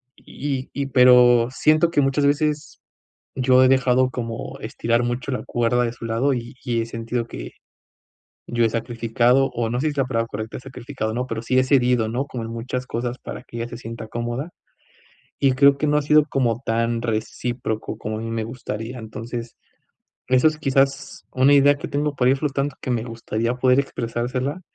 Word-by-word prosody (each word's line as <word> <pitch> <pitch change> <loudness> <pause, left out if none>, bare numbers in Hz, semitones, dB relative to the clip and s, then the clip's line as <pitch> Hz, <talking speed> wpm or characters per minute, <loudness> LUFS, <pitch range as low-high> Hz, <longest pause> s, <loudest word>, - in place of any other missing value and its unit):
y 135 -2 -5
y 140 0 -2
pero, 125 -2 +6
siento 155 +4 +3
que 145 - +3
muchas 135 +1 +1
veces, 150 +1 0 0.5
yo 130 0 +4
he 130 - +6
dejado 130 -1 +3
como 120 +2 -5
estirar 115 +1 -1
mucho 120 +3 -2
la 125 - -3
cuerda 120 +1 +1
de 115 0 -2
su 115 - -9
lado, 115 +5 +1
y 120 +1 -5
y 115 -2 0
he - - -3
sentido 115 +1 -3
que - - -8 1.0
yo 120 0 0
he - - +2
sacrificado, 120 +3 +1
o 115 -1 -1
no 120 +2 -1
sé 155 - 0
si - - 0
es 145 - -10
la 135 - +2
palabra 115 -2 -1
correcta 110 0 -6
es - - -11
sacrificado 130 -4 -5
o - - -5
no, 125 +1 -1
pero 115 -2 -4
sí 130 +2 +1
he - - +4
cedido, 125 -4 +2
¿no? 125 +4 -2
Como 120 -5 -5
en 115 - -6
muchas 125 +2 -4
cosas 120 +2 -3
para - - -7
que 120 - -10
ella 115 0 -3
se 120 - -7
sienta 115 -1 -8
cómoda. 120 +8 -4 0.9
Y 135 -2 +3
creo 140 +1 +5
que 150 +2 0
no 150 0 +3
ha - - +2
sido 150 0 +5
como 120 -3 0
tan 115 +1 0
recíproco 110 -1 -3
como 110 0 -4
a - - -5
mí 115 - -4
me 115 -1 -2
gustaría, 115 0 -6
entonces, 115 +2 -7 0.7
eso 130 +4 +4
es 155 - 0
quizás 135 -1 0
una 130 +2 +4
idea 145 +1 +6
que 170 +5 -6
tengo, 145 0 -1
por 125 -2 +2
ahí 130 - +5
flotando 140 -1 -2
que 130 - -3
me 115 -2 0
gustaría 115 0 -3
poder 130 +1 +3
expresársela, 130 +5 -3
125 Hz, 200 wpm, -22 LUFS, 115-135 Hz, 1.0 s, pero